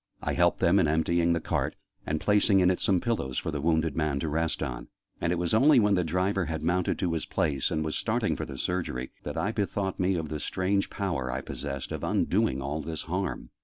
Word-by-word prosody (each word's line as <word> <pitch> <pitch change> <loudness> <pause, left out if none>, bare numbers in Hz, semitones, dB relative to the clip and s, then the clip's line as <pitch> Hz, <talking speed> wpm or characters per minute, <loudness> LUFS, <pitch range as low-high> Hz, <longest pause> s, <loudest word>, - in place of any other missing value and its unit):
I - - 0
helped - - +3
them 90 +4 +4
in 85 - +3
emptying 85 +2 +2
the 85 - +1
cart, - - -1 0.3
and 80 +1 0
placing 105 0 +4
in 90 0 +5
it 90 - -1
some 95 -3 +2
pillows 85 - -2
for - - -2
the 75 -2 -3
wounded 80 -1 +1
man 75 -3 0
to 80 - -1
rest 80 +2 -1
on; 60 - -5 0.3
and 85 - +1
it - - +2
was 85 -1 -1
only 135 +5 +6
when 105 -2 +3
the 90 -2 +2
driver 90 +3 0
had 80 0 -4
mounted 85 +2 +1
to 90 -3 0
his 80 - -2
place, 70 -4 0
and 80 0 -1
was 80 - -2
starting - - 0
for - - -4
the - - -8
Surgery, 85 -8 -2
that - - -6
I 95 +6 0
bethought 100 -3 -2
me 95 +1 +2
of 80 -3 -3
the 75 0 -3
strange 95 +4 0
power 80 -11 -2
I - - -2
possessed 70 -2 -5
of - - -4
undoing 65 +1 +1
all 75 +3 -2
this 80 -1 -4
harm. 90 +3 -3
85 Hz, 235 wpm, -28 LUFS, 75-95 Hz, 0.3 s, only